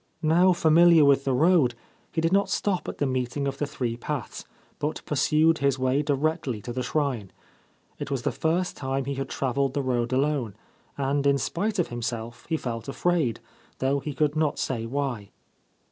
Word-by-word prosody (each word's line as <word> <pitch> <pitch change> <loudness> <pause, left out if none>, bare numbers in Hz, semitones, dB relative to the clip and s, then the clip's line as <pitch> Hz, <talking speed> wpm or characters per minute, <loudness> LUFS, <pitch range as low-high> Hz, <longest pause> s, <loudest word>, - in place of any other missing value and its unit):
Now 175 +4 +5
familiar 170 -1 +6
with 140 -1 +4
the 135 - +1
road, 155 -4 +4 0.4
he 160 - -1
did 165 +2 +1
not 200 0 +3
stop 195 -3 -1
at - - -7
the 145 - 0
meeting 130 +1 -1
of 135 0 -4
the 145 - -1
three 125 -4 -3
paths, 130 +1 -5 0.3
but 150 +1 -3
pursued 155 +3 +2
his 140 -2 +2
way 130 +2 +1
directly 145 -4 -1
to 120 - -5
the 130 - -2
shrine. 125 -6 -1 0.7
It - - -5
was 135 -4 -2
the - - +1
first 175 +3 -1
time 135 0 -2
he 140 - -2
had 135 0 -4
travelled 135 0 -1
the 140 - 0
road 120 -2 0
alone, 130 -5 0 0.4
and 140 +1 0
in 140 0 +4
spite 205 +9 -2
of 180 - 0
himself 120 -1 -5
he 160 - +1
felt 115 -5 -5
afraid, 140 -6 0 0.4
though 135 +2 +1
he 145 0 -6
could 150 +1 +1
not 155 -2 +1
say 115 -3 -2
why. 130 -5 -3
140 Hz, 185 wpm, -26 LUFS, 130-155 Hz, 0.7 s, familiar